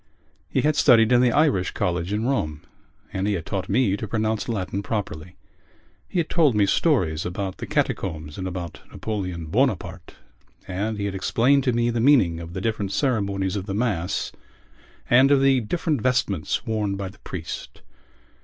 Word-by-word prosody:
He - - +1
had 150 0 +2
studied 120 -5 +5
in 120 0 +6
the 125 -1 +4
Irish 135 - +2
college 90 +1 -1
in 105 +2 -1
Rome 75 - -1 0.5
and 95 +2 -1
he 105 - +1
had 85 -3 -5
taught 95 -2 -3
me 105 -2 +2
to 110 +2 -5
pronounce 110 +1 -1
Latin 100 -2 -2
properly. 90 -5 -4 0.7
He - - -4
had 170 -3 +1
told 155 -9 +3
me 105 -1 +4
stories 95 - +1
about 95 +1 -4
the - - -6
catacombs 80 -4 -2
and 95 - -3
about 90 -2 -6
Napoleon 90 -6 -4
Bonaparte, 95 - -1 0.5
and 105 +4 -2
he 100 - -2
had 100 - -2
explained 125 +8 +2
to 125 - +3
me 120 0 +1
the 115 - -1
meaning 115 - +4
of 85 0 -8
the 95 - -4
different 105 -3 -2
ceremonies 100 -6 0
of 100 0 -4
the 100 - -3
Mass 100 -7 -1 0.8
and 130 +3 +6
of 140 -1 +5
the 135 -1 +4
different 150 +3 -1
vestments 105 -8 0
worn 105 -3 -1
by 100 -1 -4
the 95 - -13
priest. 85 -3 -7
100 Hz, 175 wpm, -24 LUFS, 90-120 Hz, 0.8 s, in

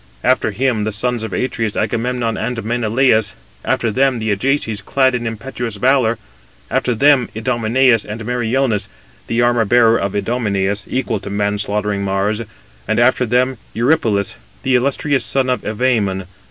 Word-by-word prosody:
After - - +2
him 125 -4 0
the 110 - -1
sons 120 +3 -1
of 110 -2 -5
Atreus, 115 -3 -2
Agamemnon 115 +1 -1
and 115 +1 -3
Menelaus; 115 -1 +1 0.3
after 115 - 0
them 135 +2 +2
the 110 -1 -1
Ajaces, 110 -1 0
clad 130 +4 +2
in 120 -1 -2
impetuous 115 0 -5
valour; 125 0 +2 0.5
after 125 - +1
them, 135 0 +4
Idomeneus 120 +1 +2
and 110 +1 -7
Meriones, 120 -3 0 0.4
the 115 +1 +1
armour 120 -1 +3
bearer 115 +1 +4
of 100 0 -2
Idomeneus, 100 -3 -1
equal 120 -4 -1
to 100 - -8
man 100 0 -1
slaughtering 105 -1 -1
Mars; 100 +3 0 0.5
and - - +1
after 125 +1 +3
them 125 +1 +1 0.2
Eurypylus, 115 -5 +1 0.3
the 130 - +1
illustrious 135 +1 +1
son 130 +2 0
of 125 - -1
Evæmon. 105 -4 0
115 Hz, 150 wpm, -18 LUFS, 105-125 Hz, 0.5 s, them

